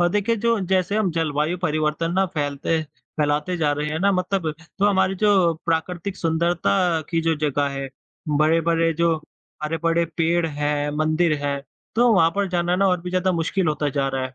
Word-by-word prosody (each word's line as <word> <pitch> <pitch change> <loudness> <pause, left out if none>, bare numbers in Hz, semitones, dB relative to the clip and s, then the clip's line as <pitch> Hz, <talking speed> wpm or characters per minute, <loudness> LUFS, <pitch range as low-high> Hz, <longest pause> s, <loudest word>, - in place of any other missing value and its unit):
और 175 - +4
देखिए, 210 +4 +1
जो 230 +1 +1
जैसे 190 +2 +1
हम 215 -4 +1
जलवायु 160 +1 -1
परिवर्तन 155 +1 0
ना 190 +1 +2
फैलते 145 +2 -1
फैलाते 150 +2 -3
जा 150 -3 +1
रहे 150 +1 -2
हैं 155 +1 -2
ना 200 +1 +3
मतलब 185 -3 -1 0.3
तो 200 - +3
हमारी 190 -1 +2
जो 195 -5 +4
प्राकृतिक 175 +3 -2
सुंदरता 165 - +1 0.3
की 165 - +1
जो 165 0 +2
जगह 145 -1 +1
है, 135 -1 -5 0.4
बड़े-बड़े 165 +2 +2
जो, 165 0 +1 0.5
हरे-भरे 165 +2 0
पेड़ 170 0 +2
हैं, 145 -1 -1
मंदिर 155 +2 +2
हैं, 140 -1 -2 0.3
तो 240 +2 +4
वहाँ 165 -5 +4
पर 200 -1 +1
जाना 175 0 0
ना 195 +1 +3
और 180 -2 +1
भी 180 +1 -6
ज़्यादा 185 0 +1
मुश्किल 170 +2 0
होता 150 -1 0
जा 135 - +1
रहा 130 - -1
है। 130 - -7
165 Hz, 185 wpm, -22 LUFS, 150-185 Hz, 0.5 s, और